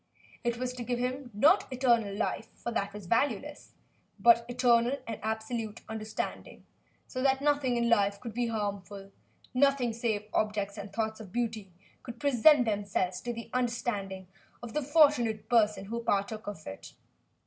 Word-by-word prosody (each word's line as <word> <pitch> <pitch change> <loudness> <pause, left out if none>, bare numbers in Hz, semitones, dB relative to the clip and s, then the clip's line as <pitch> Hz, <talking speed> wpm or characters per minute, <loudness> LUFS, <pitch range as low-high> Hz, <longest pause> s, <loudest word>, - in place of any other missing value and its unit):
It 240 -1 0
was 250 0 -3
to 250 -1 -6
give 245 +1 -1
him, 250 +1 -3
not 285 - +4
eternal 235 -6 +2
life 220 +1 -2
for 235 - -5
that 200 -3 -1
was 205 -1 -9
valueless 265 +7 -1 0.4
but 235 0 +5
eternal 245 +1 +3
and 225 -2 -5
absolute 220 0 -3
understanding, 220 -1 -5 0.4
so 255 - -4
that 265 0 +3
nothing 285 -4 +1
in 235 0 +1
life 200 -3 +3
could 230 -1 -7
be 240 +1 0
harmful, 200 -3 -4 0.4
nothing 260 -2 +3
save 220 -2 -1
objects 205 -2 0
and 200 0 -7
thoughts 220 +1 -2
of 210 -4 -10
beauty 225 -4 -3 0.3
could 240 -1 -9
present 280 0 +5
themselves 200 -4 -1
to 240 - -3
the 230 -1 -8
understanding 230 -6 -2 0.4
of 235 -2 -7
the 300 - 0
fortunate 280 -7 +3
person 215 -4 +3
who 230 +3 -4
partook 205 +1 -1
of 200 -6 -7
it. 95 0 -9
230 Hz, 160 wpm, -30 LUFS, 205-250 Hz, 0.4 s, but